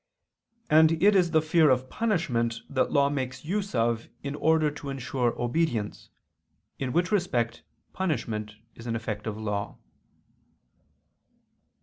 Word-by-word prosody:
And 160 +1 +6
it 205 0 +6
is 180 -3 +4
the 160 -1 +3
fear 160 -1 +4
of 130 0 +2
punishment 130 - -1
that 130 -2 0
law 140 -2 +4
makes 135 -1 -3
use 195 +1 -2
of 115 0 0
in 140 - -3
order 155 0 +2
to 145 -1 -8
ensure 130 -2 -2
obedience: 120 -4 -1 0.7
in 130 -2 -2
which 175 +6 +1
respect 120 - 0 0.3
punishment 110 - -2 0.2
is 115 - -11
an 115 - -1
effect 110 -2 -4
of 110 -1 -3
law. 105 -2 -3
135 Hz, 130 wpm, -27 LUFS, 115-160 Hz, 0.7 s, And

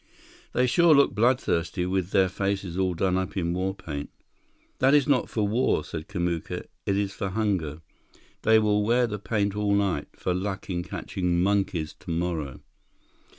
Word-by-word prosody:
"They 125 - +3
sure 165 +5 +5
look 140 -5 +4
bloodthirsty, 100 -6 +1
with 95 -1 -1
their 95 -1 +4
faces 95 -1 -2
all 95 -1 0
done 90 +2 +1
up 95 +2 -4
in 85 -2 0
war 95 +2 -1
paint." 75 -5 -6 0.7
"That 135 +2 +5
is 145 0 +4
not 140 -4 +2
for 105 -2 0
war," 115 +5 +1
said 80 0 -7
Kamuka. 85 -4 -3 0.2
"It 100 - +2
is 100 -1 -1
for 95 - -3
hunger. 90 -7 -1 0.6
They 110 0 +5
will 105 -1 +2
wear 120 +3 +3
the 105 -3 -4
paint 100 -1 -1
all 105 -1 +1
night, 95 -7 0
for 90 - -2
luck 95 +2 -3
in 85 -1 -1
catching 90 -1 -1
monkeys 95 -6 0
tomorrow." 85 -5 -3
95 Hz, 165 wpm, -26 LUFS, 90-105 Hz, 0.7 s, sure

